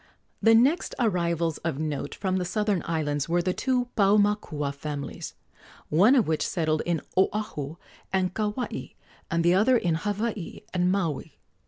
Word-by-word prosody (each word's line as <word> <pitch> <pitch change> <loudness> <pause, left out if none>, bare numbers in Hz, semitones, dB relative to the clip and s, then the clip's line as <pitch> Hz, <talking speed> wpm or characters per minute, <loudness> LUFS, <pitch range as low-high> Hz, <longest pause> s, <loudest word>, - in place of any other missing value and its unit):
The 225 0 +6
next 275 +10 +3
arrivals 170 - 0
of 160 -4 -2
note 150 -2 -3
from 190 -1 -1
the 185 - 0
southern 205 0 0
islands 150 -3 -1
were 175 +1 +2
the 185 +1 0
two 250 +1 0
Paumakua 200 -8 +2
families, 140 0 -6 0.5
one 200 - +5
of 245 - +3
which 155 -1 0
settled 155 -2 0
in 170 -4 0
Oahu 185 -6 0 0.4
and 185 -1 +1
Kauai 215 +4 -3 0.4
and 170 0 +1
the 175 +1 +4
other 225 +7 +4
in 175 -7 0
Hawaii 205 +2 -3
and 180 0 +2
Maui. 170 -8 -2
180 Hz, 150 wpm, -26 LUFS, 160-210 Hz, 0.5 s, The